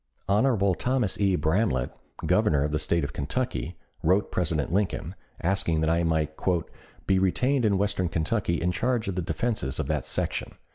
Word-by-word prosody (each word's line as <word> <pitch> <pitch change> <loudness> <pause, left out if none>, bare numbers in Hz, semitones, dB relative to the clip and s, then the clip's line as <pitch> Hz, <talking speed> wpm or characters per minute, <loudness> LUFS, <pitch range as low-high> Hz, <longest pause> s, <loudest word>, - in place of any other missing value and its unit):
Hon. 100 -2 +3
Thomas 125 -6 0
E. 100 -2 +3
Bramlette, 80 - +1 0.3
Governor 70 -1 +3
of 75 - -1
the 75 - 0
State 80 +1 +1
of 70 0 -4
Kentucky, 90 - -2 0.2
wrote 95 +5 +2
President 80 -3 0
Lincoln, 95 -4 -1 0.3
asking 85 -3 +1
that 80 0 +2
I 85 +1 +2
might 80 -2 0 0.7
"be 95 -1 +3
retained 125 +7 +2
in 100 -2 +3
western 100 -3 0
Kentucky 85 +1 0
in 90 +1 +1
charge 120 +3 0
of 100 - -1
the 90 - -2
defenses 90 - -1
of - - 0
that - - -1
section. - - -2
90 Hz, 170 wpm, -27 LUFS, 80-105 Hz, 0.7 s, Hon